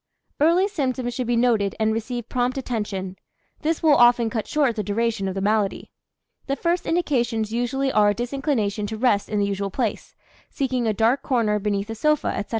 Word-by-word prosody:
Early 340 +6 +4
symptoms 260 -9 -2
should 250 -1 -3
be 240 - +1
noted 230 -4 +2
and 220 0 +2
receive 235 +1 -4
prompt 250 +1 -1
attention; 205 -7 -4 0.4
this 320 +1 -1
will 310 -2 +6
often 240 -3 +5
cut 220 -4 -3
short 280 -6 +1
the 215 - -1
duration 210 0 -1
of 190 - -3
the 195 - -2
malady. 210 0 0 0.6
The 275 - 0
first 340 +4 -1
indications 240 -10 0
usually 265 +3 0
are 210 -3 +4
a 205 - 0
disinclination 240 -4 -1
to 220 +1 -5
rest 215 -4 +1
in 210 - -1
the 200 - +2
usual 200 0 -2
place, 225 +1 -3 0.3
seeking 255 -4 -1
a - - +3
dark 225 +6 +2
corner 225 -5 +1
beneath 205 +1 -2
a - - -2
sofa, 305 +6 +1
etc. 200 - -4
235 Hz, 190 wpm, -23 LUFS, 210-265 Hz, 0.6 s, will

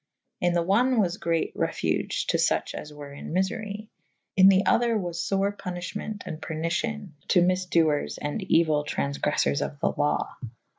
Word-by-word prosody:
In 175 -1 +2
the 170 -1 +2
one 235 +7 +3
was 185 -2 +1
great 165 -3 0
refuge - - -1
to - - +1
fuche - - +1
as 150 - -7
were 145 -1 -10
in 140 - -8
myfery: 205 +3 -2 0.5
In 190 0 +8
the 195 0 +4
other 235 -1 +3
was 175 -4 -3
fore 195 +1 +1
punyffhement 200 +3 -5
and 160 -3 -6
pernicion 175 +7 -2 0.2
to 180 - +4
myfdoers 175 -5 +1
and 145 +8 -3
euyl 160 -5 +3
tran[f] 70 - -2
greffours 70 +1 +1
of 145 - -6
the - - +1
law. 145 - 0
180 Hz, 160 wpm, -26 LUFS, 155-200 Hz, 0.5 s, In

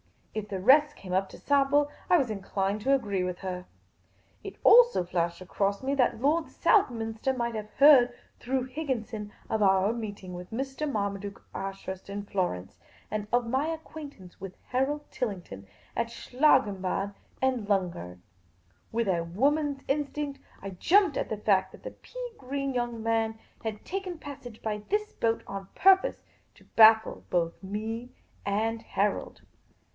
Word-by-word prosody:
If 215 -1 -4
the 190 -3 -3
rest 295 +7 +5
came 185 -2 -7
up 190 +1 +1
to - - -11
sample, 285 +1 +3 0.2
I 355 - +7
was 260 -8 0
inclined 195 0 -2
to 275 +5 +4
agree 200 -8 -1
with 180 -1 -3
her. 180 -1 -5 0.8
It - - -7
also 480 - +7
flashed 170 0 -1
across 200 +3 -1
me 270 +1 0
that 245 -4 +2
Lord 310 +4 +2
Southminster 235 - +1
nn'ght 235 -2 -2
have 215 -1 -5
heard 265 -4 +7 0.2
through 260 +1 -1
Higginson 250 -6 -4 0.2
of 220 - -1
our 195 +1 +4
meeting 205 -5 -6
with 180 0 -8
Mr. 270 +5 -3
Marmaduke 200 -2 -3
Ashurst 195 -1 -6
at 200 0 -5
Florence, 95 - -2 0.3
and 210 0 -2
of 245 0 +2
my 265 +6 0
acquaintance 310 - -8
with 190 -1 -7
Harold 270 +4 0
Tillington 180 - -5 0.3
at 235 - 0
Schlangenbad 200 -7 +1 0.3
and 255 -5 +1
Lungern. 170 - -1 0.7
With 230 -2 0
a 170 -2 +1
woman's 275 - 0
instinct, 290 0 -2 0.2
I 195 - -5
jumped 335 - +3
at - - -1
the 220 - -2
fact 190 -2 +2
that - - -14
the - - -6
pea - - -8
green 275 +1 -3
young 240 -2 -2
man 225 -1 0 0.3
had 220 -2 -5
taken 375 -2 -4
passage 275 -7 -10
by 210 -1 -2
this 425 +1 0
boat, 225 0 0
on 195 -1 -6
pur 385 0 +7
pose 380 - -5 0.3
to - - -19
baffle 220 0 +6
both 170 -2 0
me 220 +5 -4 0.4
and 220 +3 0
Harold. 200 +1 -1
225 Hz, 155 wpm, -28 LUFS, 195-275 Hz, 0.8 s, I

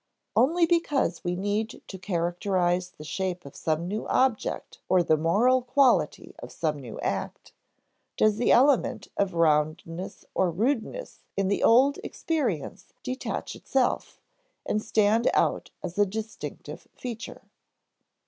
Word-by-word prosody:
Only 335 +6 +4
because 300 - +1
we 175 0 -1
need 205 +4 -2
to 190 - -9
characterize 175 0 0
the 155 - -13
shape 180 +2 -3
of 140 - -11
some 160 +2 -1
new 210 +4 -3
object 255 -4 0
or 185 -1 +4
the 155 - +3
moral 210 +12 +3
quality 255 +1 +2
of - - -9
some 150 -3 -2
new 120 -5 -9
act, - - -4 0.7
does 215 -1 +3
the 240 - +2
element 255 -4 +3
of 190 -3 0
roundness 165 +2 0
or 185 - +2
rudeness 240 - -2 0.2
in 195 -1 +1
the 200 - 0
old 265 +5 +5
experience 255 - -3
detach 255 +1 -4
itself, 265 -2 -1 0.5
and 215 - 0
stand 215 +2 +2
out - - +1
as 175 +4 -5
a 205 - +6
distinctive 220 +3 -7
feature. 240 -1 -7
205 Hz, 130 wpm, -27 LUFS, 175-250 Hz, 0.7 s, a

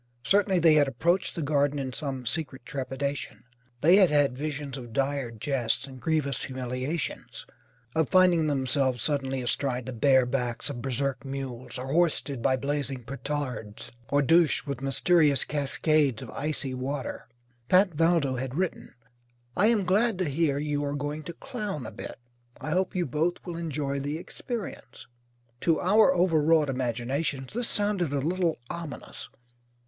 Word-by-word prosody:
Certainly 195 +3 +3
they 165 -2 +6
had 150 -2 +5
approached 170 +7 0
the 165 - -2
Garden 145 0 +1
in 130 -2 -3
some 135 -3 -4
secret 130 +1 -3
trepidation. 140 0 -4 0.4
They 175 +5 +6
had 190 -4 +6
had 145 -4 +3
visions 145 -1 -4
of 120 -4 -8
dire 135 -1 0
jests 120 +2 -1
and 130 -2 -11
grievous 145 -3 0
humiliations: 130 +4 -4 0.5
of 160 -2 +1
finding 180 -4 +5
themselves 130 -3 +1
suddenly 135 -3 0
astride 125 0 -1
the 130 - -5
bare 130 +2 +4
backs 125 +1 -1
of 120 -4 -6
berserk 135 -1 -1
mules, 130 -3 -5
or 130 +2 -4
hoisted 155 -6 +1
by 130 - +3
blazing 140 -2 -2
petards, 130 -4 -5 0.2
or 145 0 +3
douched 165 +2 +4
with 140 -3 -4
mysterious 145 +1 +3
cascades 145 -3 +1
of 120 - -9
icy 145 -2 -2
water. 130 +2 -4 0.4
Pat 185 0 +5
Valdo 160 -4 +2
had 130 +1 -4
written: 185 +1 -3 0.6
"I 205 - +4
am 220 -4 +2
glad 210 +3 +2
to 185 - 0
hear 145 -1 +1
you 145 0 -1
are 145 0 -2
going 145 +1 -3
to 170 - -6
clown 210 - -5
a - - -6
bit. - - -8 0.4
I 155 - -5
hope 185 +2 0
you 180 -1 +1
both 155 +6 0
will 175 -2 -5
enjoy 150 -4 -2
the 145 +3 -3
experience." 195 - -7 0.5
To 165 +2 +2
our 215 +8 +5
overwrought 160 - +3
imaginations 130 +3 -2
this 240 +1 -1
sounded 205 -7 +1
a 145 - 0
little 170 +3 0
ominous. 125 - -7
145 Hz, 155 wpm, -27 LUFS, 130-165 Hz, 0.6 s, they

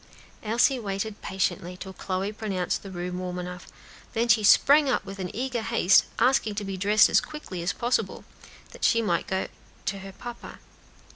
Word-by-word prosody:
Elsie 235 +4 +2
waited 205 0 -4
patiently 180 -1 -2
till 190 0 -8
Chloe 190 +2 -3
pronounced 195 -5 -2
the 195 - -9
room 180 0 -4
warm 180 -1 -4
enough, 180 0 -7 0.5
then 235 0 +1
sprang 270 +7 +6
up 255 - 0
with 195 0 -8
an 180 -1 -3
eager 250 0 -2
haste, 220 -4 +4
asking 250 -5 +2
to 210 - -3
be 195 0 -4
dressed 205 +3 +5
as - - +4
quickly 300 - -7
as 175 +2 0
possible, 240 +8 -1 0.5
that - - -12
she 230 0 +4
might 175 -5 0
go 190 0 -1 0.4
to 200 0 -2
her 195 0 -9
papa. 240 +5 -9
200 Hz, 170 wpm, -26 LUFS, 185-230 Hz, 0.5 s, sprang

